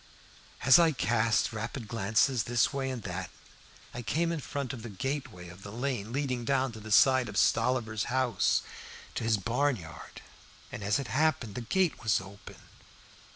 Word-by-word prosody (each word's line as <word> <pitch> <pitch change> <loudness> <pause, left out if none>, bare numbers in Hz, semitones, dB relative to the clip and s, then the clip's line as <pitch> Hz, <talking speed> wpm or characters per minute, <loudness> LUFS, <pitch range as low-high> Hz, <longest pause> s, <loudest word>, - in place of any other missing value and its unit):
As 130 - +8
I 165 -2 +4
cast 115 0 +1
rapid 115 +2 -5
glances 115 +3 +1
this 120 +3 +2
way 135 -1 -2
and 125 -4 -5
that, 90 -2 -5 0.6
I 120 - -5
came 165 +8 0
in 165 - -2
front 140 -1 -4
of 125 - -7
the 115 - -7
gateway 125 -4 -4
of 85 +3 -12
the 100 - -9
lane 120 -2 -3
leading 130 -2 -2
down 130 +1 +1
by 110 - -10
the 110 0 -9
side 130 +1 +5
of 105 - -6
Stolliver's 110 -5 +2
house 130 -1 +1 0.5
to - - -3
his 110 -1 +2
barnyard. 115 - -3 0.5
As 105 0 0
it 140 - -3
happened, 140 -7 +1
the 125 - -5
gate 170 +7 0
was 110 -2 +2
open. 95 +1 -12
120 Hz, 165 wpm, -30 LUFS, 105-135 Hz, 0.6 s, As